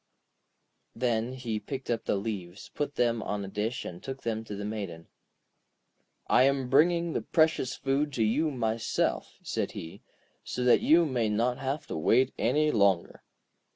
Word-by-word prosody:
Then 115 0 0
he 120 -4 -3
picked 130 +2 -5
up 115 - -2
the - - +1
leaves, 100 -3 -5
put 145 -1 -3
them 115 -2 +1
on 105 -1 -3
a - - -7
dish, 105 +5 -3
and 90 0 -7
took 135 0 -7
them 110 -1 -2
to 105 - -6
the 100 +1 -5
Maiden. 100 -6 -5 1.2
'I 120 - +4
am 135 -2 +1
bringing 170 +3 +4
the - - -1
precious 160 -5 +2
food 140 +2 0
to 115 - +1
you 150 +9 +2
myself,' 115 -4 -1
said - - -2
he, 80 0 -8 0.4
'so 125 - -3
that 125 - +5
you 165 +2 +5
may 125 -7 0
not 120 +4 0
have 140 +3 -3
to - - -5
wait 125 +11 +3
any 150 0 +2
longer.' 100 -6 +2
120 Hz, 165 wpm, -29 LUFS, 105-135 Hz, 1.2 s, that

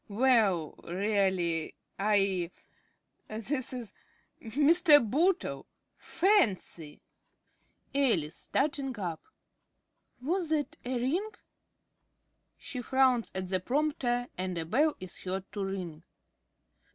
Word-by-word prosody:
Well, 210 - +3
really 185 -4 0 0.2
I 195 -4 +2 0.8
this 235 +5 -3
is 245 -4 -6 0.5
Mr. 300 +7 +5
Bootle! 310 - 0 0.3
Fancy! 205 - +1 0.9
~Alice~ 225 - +1
(starting 270 -3 -1
up). 175 -5 -4 1.0
Was 335 +6 -1
that 305 -2 -1
a 250 0 -2
ring? 335 - 0 1.3
(_She 250 -2 -6
frowns 260 -3 +3
at 185 -1 -3
the 185 -1 +1
prompter 245 - 0
and 185 -1 -2
a 165 - -2
bell 290 - +2
is 185 -1 -8
heard 190 +1 -4
to 205 -2 -3
ring. 180 -5 -5
225 Hz, 95 wpm, -30 LUFS, 185-280 Hz, 1.3 s, Mr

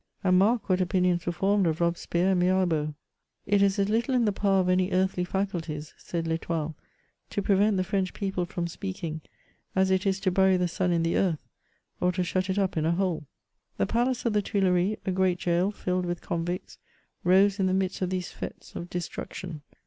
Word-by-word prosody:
And 185 -1 +4
mark 215 +2 +2
what 185 -1 +2
opinions 180 -1 +1
were - - +2
formed 195 +2 +2
of 160 -1 0
Robespierre 170 +2 +1
and 185 - +2
Mirabeau! 180 -4 +2
*^ 155 - -6 0.5
It 205 0 +3
is 200 0 +3
as 200 -1 +2
little 235 +5 +1
in 240 -2 +3
the 210 - +3
power 195 -1 +2
of 180 - -1
any 185 0 +2
earthly 185 -1 +1
fa 190 +2 0
culties," 160 -5 -6
said 170 -1 -4
TEstoile, 160 -1 -2 0.3
*' - - -44
to 205 - -2
prevent 200 +1 +3
the 185 - +2
French 190 -1 -1
people 190 -3 -2
from 170 0 -3
speak 190 +2 -6
ing, 160 -1 -3 0.5
as 190 0 +3
it 190 +2 +2
is 190 0 +1
to 190 - +1
bury 190 0 +4
the 180 0 +1
sun 180 +1 0
in 170 -1 +2
the 165 - +1
earth, 170 -6 0 0.5
or 180 - +2
to 180 0 0
shut 185 +2 -1
it 190 - 0
up 195 -4 0
in 155 - +1
a 170 - +3
hole." 175 -5 -1 0.5
The 100 - +2
palace 245 - 0
of 230 - +2
the 210 - +3
Tuileries, 195 0 +1
a 190 - 0
great 185 -1 +1
gaol 175 +3 +1
filled 180 -3 -2
with 175 0 -2
convicts, 175 +1 -4 0.4
rose 195 +3 +4
in 190 - +2
the - - +1
midst 190 0 -1
of 185 - 0
these 185 -1 -3
f^tes - - -8
of 175 - -6
destruction. 175 -2 -5
185 Hz, 215 wpm, -27 LUFS, 175-195 Hz, 0.5 s, And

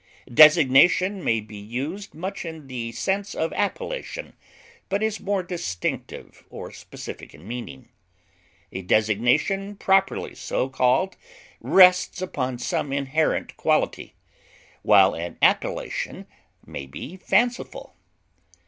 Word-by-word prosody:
Designation 165 +6 +6
may 115 - +2
be 105 0 -11
used 135 - -6
much 190 +5 -5
in 160 -3 -8
the 120 -3 -5
sense 195 - -2
of 160 - -2
appellation, - - -4 0.6
but 200 +2 0
is 220 0 -1
more 200 -2 -1
distinctive 165 - -5
or - - -8
specific - - -10
in 80 +7 -15
meaning; 115 - -7 0.8
a 95 - -5
designation 125 - +1
properly 195 -1 +1
so 130 - -2
called 130 +8 +1 0.4
rests 180 -1 +5
upon 130 -9 -3
some 135 +3 -2
inherent 140 +3 -1
quality, - - 0 0.7
while 95 -2 +5
an 85 +1 -6
appellation - - 0 0.4
may 70 - -7
be 140 - -8
fanciful. 240 +6 -1
155 Hz, 110 wpm, -24 LUFS, 115-190 Hz, 0.8 s, Designation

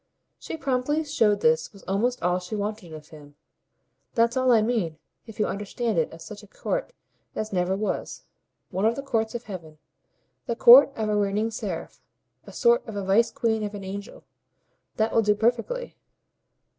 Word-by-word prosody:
She - - -6
promptly 285 +2 0
showed 225 -9 +2
how - - -12
this 160 0 +2
was 200 - -16
almost 235 +6 -1
all 180 +1 +2
she 180 +4 -6
wanted 205 -3 -4
of 155 -1 -11
him. 145 -2 -14 0.8
"That's 230 0 +3
all 255 -1 +3
I 225 -3 +5
mean, 215 -9 -1 0.3
if 225 - -11
you 210 - +3
understand 210 0 -2
it 160 - 0
of 165 0 -11
such 210 +2 -9
a - - -15
court - - -3 0.4
as 215 -1 -4
never 180 +1 +1
was: 210 +2 -3 0.5
one 190 +2 -1
of 225 +1 +3
the 275 - -5
courts 225 -3 -1
of 240 - -4
heaven, 170 -8 -9 0.7
the 235 - -1
court 250 +4 +9
of 220 -1 -2
a 210 - +1
reigning 205 +2 0
seraph, 205 -7 -6 0.5
a - - -9
sort 475 +1 +3
of 220 - -7
a 200 - -3
vice 210 +5 +3
queen 220 -2 -1
of 210 0 -4
an 200 - -7
angel. 200 +2 -8 0.7
That 220 +1 0
will 225 - +4
do 210 -1 +2
perfectly." 240 - -1
215 Hz, 185 wpm, -25 LUFS, 195-235 Hz, 0.8 s, court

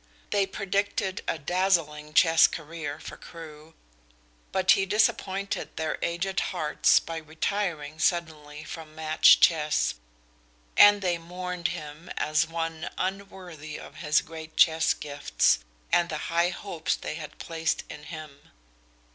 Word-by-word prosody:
They 200 -1 +2
predicted 200 0 -1
a - - 0
dazzling 155 -2 0
chess 165 -2 +7
career 155 -2 -6
for - - -9
Crewe, 160 -1 -12 0.8
but 190 0 +3
he 195 - +4
disappointed 200 -1 0
their 160 -1 -2
aged 175 +3 -1
hearts 155 -5 +2
by 165 0 -6
retiring 160 -1 -3
suddenly 155 -3 -1
from 155 -1 -9
match 155 0 +5
chess, 150 - +3 0.8
and 205 -1 +7
they 175 -2 0
mourned 180 0 -4
him 150 +3 -7
as 155 +2 +1
one 165 0 -4
unworthy 185 -5 -5
of 150 - -12
his 150 -2 +2
great 160 -1 -10
chess 160 -1 +4
gifts 145 -1 +1 0.3
and 170 0 +3
the 155 - -3 0.2
high 170 +1 +3
hopes 175 -3 -3
they - - -5
had 155 -1 -8
placed 165 -1 -2
in 150 - -10
him. 155 -3 -10
165 Hz, 130 wpm, -27 LUFS, 155-180 Hz, 0.8 s, chess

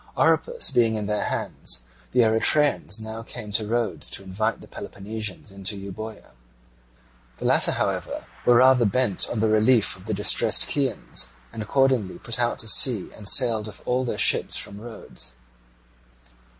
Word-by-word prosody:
Oropus 485 -1 +2
being 115 -2 +2
in 105 -1 -3
their 105 0 -2
hands, - - -3 0.3
the 125 - +3
Eretrians 115 +1 +2
now 110 +1 -7
came 115 -2 -9
to 110 0 -1
Rhodes 115 0 -2
to 95 - -2
invite 105 +4 -2
the - - -14
Peloponnesians 105 0 -7
into 100 +1 -4
Euboea. 105 +3 -9 1.1
The - - -7
latter, - - +3
however, - - -3 0.2
were 120 - +4
rather 130 0 +5
bent 110 -2 0
on 110 - -3
the 110 - +2
relief 110 +1 +2
of 95 0 -16
the 110 - -2
distressed 105 - +3
Chians, 135 - -1 0.2
and 110 - -6
accordingly 130 -3 0
put 115 0 -5
out 120 -1 0
to 110 - -5
sea 110 -2 +4
and 105 -3 +1
sailed 110 0 +4
with 105 - -7
all 125 +1 0
their 120 - -4
ships - - +2
from 100 +1 -3
Rhodes. 110 - -9
110 Hz, 160 wpm, -23 LUFS, 105-120 Hz, 1.1 s, rather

